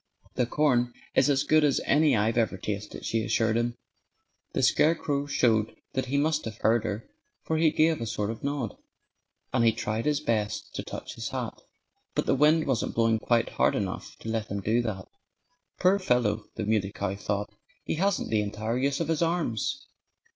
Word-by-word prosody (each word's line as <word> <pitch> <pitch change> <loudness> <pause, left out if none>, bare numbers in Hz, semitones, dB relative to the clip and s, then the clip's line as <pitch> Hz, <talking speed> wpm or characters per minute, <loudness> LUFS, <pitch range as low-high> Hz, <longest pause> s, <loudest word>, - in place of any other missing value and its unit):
"The 125 -1 0
corn 125 -4 +2 0.2
is - - +4
as 140 0 +3
good 155 +1 +4
as 145 -2 +3
any 150 0 +4
I've 110 +2 +1
ever 115 -4 +1
tasted," 105 +1 -5
she 115 -1 0
assured 110 +1 +1
him. 120 +1 0 0.8
The - - 0
scarecrow 150 -3 +2
showed 115 -6 +2 0.2
that 130 0 -1
he 140 +3 0
must 155 +1 +1
have 110 -3 -6
heard 115 0 +2
her, 105 +2 -4 0.4
for 160 - -1
he 160 0 +4
gave 155 -1 +2
a 115 - -2
sort 105 0 -2
of 115 - -9
nod. 140 -5 -2 0.8
And 115 - +3
he 115 - +6
tried 110 0 -3
his 150 -1 +2
best 110 -8 -2
to - - -3
touch - - -7
his - - -5
hat. - - -5 0.5
But - - +1
the - - +3
wind 155 +3 +4
wasn't 130 -5 -1
blowing 115 -1 +3
quite 115 0 +1
hard - - +2
enough - - -4
to 115 - -6
let 110 -1 -1
him 100 - -3
do 110 +5 +2
that. 100 -5 -4 0.7
"Poor 190 +2 +4
fellow!" 115 - +1
the - - -3
Muley 105 -2 +1
Cow 100 -1 -2
thought. 100 +1 -3 0.3
"He - - -2
hasn't 195 -1 0
the 110 -1 +3
entire 110 +3 -2
use 140 +3 0
of 165 - -1
his 165 -1 0
arms." 170 - -1
120 Hz, 190 wpm, -27 LUFS, 110-150 Hz, 0.8 s, he